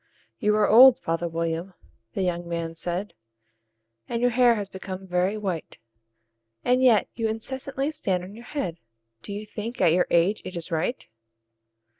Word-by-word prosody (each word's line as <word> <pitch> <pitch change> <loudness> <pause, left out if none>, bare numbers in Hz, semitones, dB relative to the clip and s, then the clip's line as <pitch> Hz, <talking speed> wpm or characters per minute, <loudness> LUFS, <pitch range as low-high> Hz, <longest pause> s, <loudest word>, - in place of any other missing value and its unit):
"YOU 210 -3 +2
are 215 -1 +3
old, 250 +3 +8
father 165 -8 -2
William," 165 +2 -3 0.4
the 195 - 0
young 175 -1 -2
man 165 -1 -3
said, 175 +4 -3 1.0
"And 235 - -1
your 245 +1 +2
hair 240 0 +5
has 205 -2 -3
become 190 0 -7
very 185 +3 0
white; 190 -6 -4 0.9
And 250 +1 +3
yet 240 -5 +5
you 225 -1 -1
incessantly 265 +5 -3
stand 185 - -1
on 190 +2 -9
your 235 +3 -12
head 185 - -4 0.4
Do - - -8
you 205 +1 -5
think, 225 +3 -6
at 160 - +4
your 180 +1 +2
age, 175 +5 +2
it 185 - -7
is 170 -1 -4
right? 165 +9 -2
195 Hz, 165 wpm, -25 LUFS, 175-230 Hz, 1.0 s, old